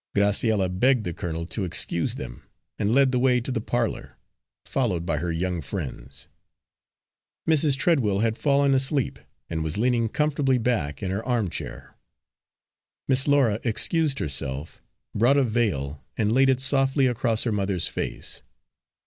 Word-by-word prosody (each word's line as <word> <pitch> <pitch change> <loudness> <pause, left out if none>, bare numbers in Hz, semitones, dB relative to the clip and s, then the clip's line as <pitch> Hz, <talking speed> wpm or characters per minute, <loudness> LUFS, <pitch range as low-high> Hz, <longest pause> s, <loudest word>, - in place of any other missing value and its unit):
Graciella 100 0 +3
begged 115 +7 +2
the 90 -3 -4
colonel 85 -2 -4
to 100 +4 -3
excuse 85 -1 -1
them, - - -8 0.4
and 100 - +1
led 135 +1 +4
the 125 - +1
way 125 -1 +3
to 120 +3 -5
the 115 -3 -1
parlour, 120 0 -2 0.5
followed 95 -11 -1
by 75 - 0
her 85 +3 -2
young 90 +1 -2
friends. 65 -3 -7 1.2
Mrs. 150 -3 +3
Treadwell 125 - +2
had 110 -1 +1
fallen 140 +1 +2
asleep, 135 0 0 0.3
and 80 -1 -3
was 80 +3 -3
leaning 115 0 +1
comfortably 145 -1 +1
back 110 - -1
in 95 - -2
her 100 +4 -2
armchair. 105 - -3 1.1
Miss 135 +1 +2
Laura 135 -7 +3
excused 140 +5 +1
herself, 70 +1 -3 0.3
brought 120 +6 +4
a 140 - +4
veil, 90 - -1
and 105 0 +1
laid 135 +2 +4
it 130 -1 +2
softly 135 0 +2
across 115 -2 +1
her 115 - 0
mother's 100 -4 +1
face. - - -4
115 Hz, 150 wpm, -25 LUFS, 90-135 Hz, 1.2 s, led